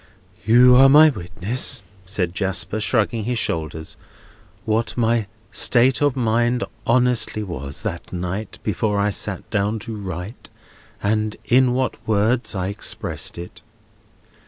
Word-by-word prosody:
"You 125 Hz, +2 st, +6 dB
are 135 Hz, +1 st, +7 dB
my 155 Hz, +3 st, +8 dB
witness," 100 Hz, +4 st, -3 dB, 0.2 s
said 90 Hz, -3 st, -2 dB
Jasper, 100 Hz, +2 st, -2 dB
shrugging 110 Hz, 0 st, 0 dB
his 125 Hz, 0 st, -1 dB
shoulders, 80 Hz, -6 st, -3 dB, 0.7 s
"what 110 Hz, +2 st, -1 dB
my 115 Hz, -2 st, +1 dB, 0.2 s
state 130 Hz, +2 st, +3 dB
of 145 Hz, -2 st, +2 dB
mind 120 Hz, 0 st, +1 dB, 0.2 s
honestly 120 Hz, -3 st, +2 dB
was, 70 Hz, -7 st, -6 dB
that -, -, -5 dB
night, 90 Hz, +4 st, -4 dB
before 105 Hz, +1 st, -1 dB
I 100 Hz, +1 st, +1 dB
sat -, -, -3 dB
down 105 Hz, +2 st, 0 dB
to 115 Hz, -2 st, -5 dB
write, 95 Hz, +2 st, -7 dB, 0.5 s
and 105 Hz, +1 st, 0 dB
in 125 Hz, 0 st, +4 dB
what 130 Hz, 0 st, -1 dB
words 110 Hz, +2 st, +1 dB
I 95 Hz, 0 st, -2 dB
expressed 100 Hz, -, -3 dB
it. 85 Hz, +1 st, -9 dB
110 Hz, 130 wpm, -21 LUFS, 100-120 Hz, 0.7 s, my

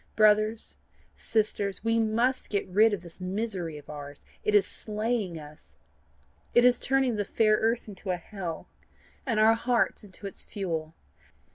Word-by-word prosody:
Brothers, 215 Hz, +1 st, +3 dB, 0.4 s
sisters, 210 Hz, -3 st, -1 dB
we 225 Hz, 0 st, +2 dB
MUST 230 Hz, +4 st, +1 dB
get 200 Hz, -, -1 dB
rid 215 Hz, +4 st, +5 dB
of 200 Hz, -4 st, -3 dB
this 170 Hz, +1 st, -13 dB
misery 185 Hz, -4 st, -3 dB
of 145 Hz, -, -13 dB
ours. 145 Hz, -1 st, -9 dB, 0.2 s
It 210 Hz, -, +2 dB
is 205 Hz, -, +6 dB
slaying 215 Hz, -4 st, -2 dB
us. 150 Hz, 0 st, -13 dB, 0.8 s
It 240 Hz, -, +7 dB
is 245 Hz, -1 st, +5 dB
turning 265 Hz, -4 st, +1 dB
the 205 Hz, -, +1 dB
fair 215 Hz, +1 st, +3 dB
earth 230 Hz, +1 st, 0 dB
into 200 Hz, -1 st, -8 dB
a 180 Hz, -, +1 dB
hell, 175 Hz, -2 st, -6 dB, 0.6 s
and 230 Hz, -4 st, +1 dB
our 220 Hz, +1 st, +6 dB
hearts 235 Hz, 0 st, +1 dB
into 200 Hz, 0 st, -12 dB
its 195 Hz, -, -6 dB
fuel. 165 Hz, -5 st, -4 dB
210 Hz, 155 wpm, -28 LUFS, 180-225 Hz, 0.8 s, It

